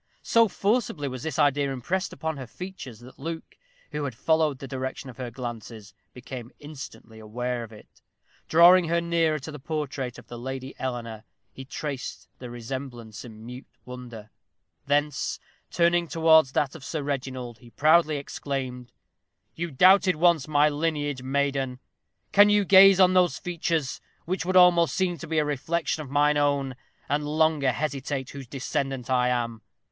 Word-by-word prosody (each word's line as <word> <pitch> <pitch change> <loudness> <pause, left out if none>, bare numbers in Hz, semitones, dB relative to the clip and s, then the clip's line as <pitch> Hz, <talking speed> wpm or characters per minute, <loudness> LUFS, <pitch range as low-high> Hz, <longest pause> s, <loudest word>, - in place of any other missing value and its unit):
So 230 -1 +4
forcibly 200 - -1
was 130 -2 -6
this 160 -1 -4
idea 145 -2 +2
impressed 180 +9 -2
upon 160 +2 -4
her 130 -2 -7
features 140 - -9
that 125 +2 -14
Luke, 160 +3 -6 0.4
who 150 0 -3
had 130 -5 -5
followed 155 +1 +1
the 135 - -8
direction 130 0 -5
of - - -19
her 125 -2 -5
glances, 115 -4 -8 0.2
became 125 0 -9
instantly 140 -6 -10
aware 120 +3 -3
of 115 - -11
it. 105 - -17 0.5
Drawing 175 +2 +7
her 170 +1 +2
nearer 170 -2 +1
to 155 +2 -8
the 150 - -9
portrait 135 -4 -4
of - - -13
the 120 - -9
Lady 130 +1 -6
Eleanor, 115 -4 -5 0.3
he 135 - -9
traced 140 -1 -6
the 125 - -8
resemblance 120 -2 -7
in 110 -2 -12
mute 125 +2 -9 0.2
wonder; 120 -4 -10 0.6
thence, 145 +1 0 0.3
turning 170 0 +2
towards 160 -4 +4
that 140 -2 0
of 160 - -11
Sir 150 +1 -4
Reginald, 130 -4 -4
he 120 - -16
proudly 155 +3 +3
exclaimed: 130 -3 -5 0.6
"You 170 +1 -4
doubted 185 +5 +5
once 165 -3 +3
my 150 -1 +4
lineage, 145 -3 -1
maiden 135 -1 -1 0.5
can 205 +1 +7
you 205 -1 +3
gaze 195 0 +8
on 185 -1 +6
those 180 -2 +3
features, 165 -5 -2 0.2
which 180 0 -2
would 185 0 +3
almost 175 -2 +5
seem 180 -3 0
to 170 - -8
be 160 +1 -2
a 155 - +3
reflection 155 +3 -1
of 145 - -9
mine 145 +1 +3
own, 140 -2 +1 0.3
and 145 +1 0
longer 150 -2 +2
hesitate 140 -1 -3
whose 140 -2 -9
descendant 135 -1 -3
I 125 -1 +2
am? 115 -2 -2
140 Hz, 160 wpm, -26 LUFS, 125-160 Hz, 0.6 s, gaze